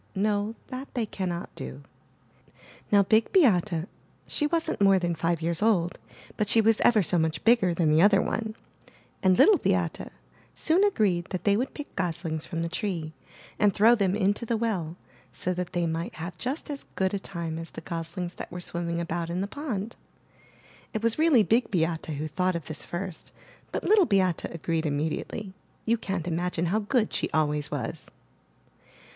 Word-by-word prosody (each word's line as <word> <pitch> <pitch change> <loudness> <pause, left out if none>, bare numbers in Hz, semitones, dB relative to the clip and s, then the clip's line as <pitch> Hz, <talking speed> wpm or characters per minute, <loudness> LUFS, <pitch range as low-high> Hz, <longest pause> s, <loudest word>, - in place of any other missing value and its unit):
— - - -36
no, 210 +2 -1
that 260 +1 -7
they 235 -3 0
cannot 180 -4 -4
do. 65 +2 -8 1.1
Now 200 -1 +6
Big 220 +3 +3
Beate 190 - +3 0.2
— - - -35
she 295 - -1
wasn't 330 -8 -1
more 195 -1 +6
than 175 -2 0
five 165 0 -1
years 170 +1 0
old, 185 -6 +2 0.4
but 210 -1 0
she 230 - +5
was 225 0 +3
ever 220 -4 +5
so 175 0 +2
much 160 -2 -1
bigger 225 -6 +4
than 165 -3 +2
the 155 +2 +5
other 200 +1 +6
one 220 +3 -2 0.3
— - - -28
and 185 -2 +4
Little 415 -3 +6
Beate, - - 0 0.5
soon 340 +5 +2
agreed 205 - +2
that 185 -1 -5
they 200 -1 +4
would 250 +5 -2
pick 295 - -8
goslings 165 -3 -2
from 165 -1 -3
the - - -1
tree 165 -3 -3 0.5
and 205 -2 +3
throw 220 +3 +6
them 200 -4 +2
into 205 +2 +1
the 230 0 0
well, 190 -8 -2 0.4
so 185 - -2
that 180 0 -4
they 175 -1 +1
might 165 +1 -3
hav"e 170 +2 -6
just 275 +5 -3
as 280 - -6
good 190 0 0
a 200 - 0
time 170 -4 -5
as 165 0 -7
the - - -9
goslings 170 +1 -4
that - - -8
were 180 - -6
swimming 170 -1 -2
about 170 0 -3
in 175 +2 -2
the - - 0
pond. 225 -3 -4 1.0
It 220 - -2
was 230 +4 +1
really 310 -8 +5
Big 230 +4 +2
Beate 165 -3 0
who 155 0 -3
thought 180 +4 0
of 165 -4 -4
this 155 0 -3
first, 180 -1 -6 0.4
but - - -3
Little 410 -5 +5
Beate 185 -4 +2
agreed 165 -1 -2
immediately; 155 +7 -3 0.3
you 230 - +3
can't 190 -5 -3
imagine 175 0 -1
how 215 - +3
good 220 +1 0
she - - 0
always 150 -1 0
was. 125 -6 -4
185 Hz, 185 wpm, -27 LUFS, 165-220 Hz, 1.1 s, Now